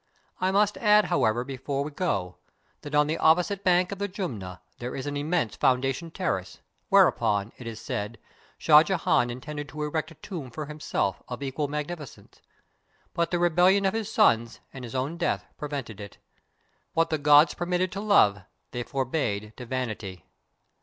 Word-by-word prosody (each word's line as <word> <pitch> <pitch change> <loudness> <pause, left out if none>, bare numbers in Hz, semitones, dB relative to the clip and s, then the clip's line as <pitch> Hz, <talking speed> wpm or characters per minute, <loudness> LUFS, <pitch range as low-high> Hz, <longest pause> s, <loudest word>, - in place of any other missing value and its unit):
I 185 - +1
must 205 +2 +2
add, 210 -1 +5
however, 120 -6 +2
before 135 +1 -3
we 150 - -6
go, 100 - -2 0.4
that 150 0 -5
on 150 0 +5
the 155 +2 -2
opposite 180 +5 +3
bank 180 0 +3
of 200 - -5
the 200 - -1
Jumna 115 - -5 0.2
there 120 +1 -5
is 130 - -5
an 145 0 -3
immense 150 -4 -1
foundation 135 +6 +1
terrace, 160 - -3 0.3
whereon, 100 +1 +3
it 120 - -8
is 115 -1 -6
said, 105 +1 -4 0.4
Shah 150 -1 +7
Jehan 165 -8 +1
intended 145 +4 -6
to 150 +2 -5
erect 155 +1 -2
a 165 - -14
tomb 155 -4 -7
for 150 +6 -6
himself, 150 -9 -2
of 125 +3 -6
equal 140 +2 -2
magnificence, 150 0 -7 0.7
but 170 0 0
the 175 - 0
rebellion 180 +3 +4
of 190 - +2
his 225 -1 -3
sons, 115 - +3
and 130 - -8
his 120 +1 -7
own 135 +6 -2
death, 170 - -1
prevented 135 -8 -5
it. 100 - -10 0.8
What 165 0 +1
the 155 - 0
gods 145 +2 +6
permitted 180 +1 -1
to 195 - -5
Love, 105 - +4 0.3
they 120 - -3
forbade 120 -6 -2
to 125 - -8
Vanity. 110 -9 -4
145 Hz, 170 wpm, -27 LUFS, 120-175 Hz, 0.8 s, Shah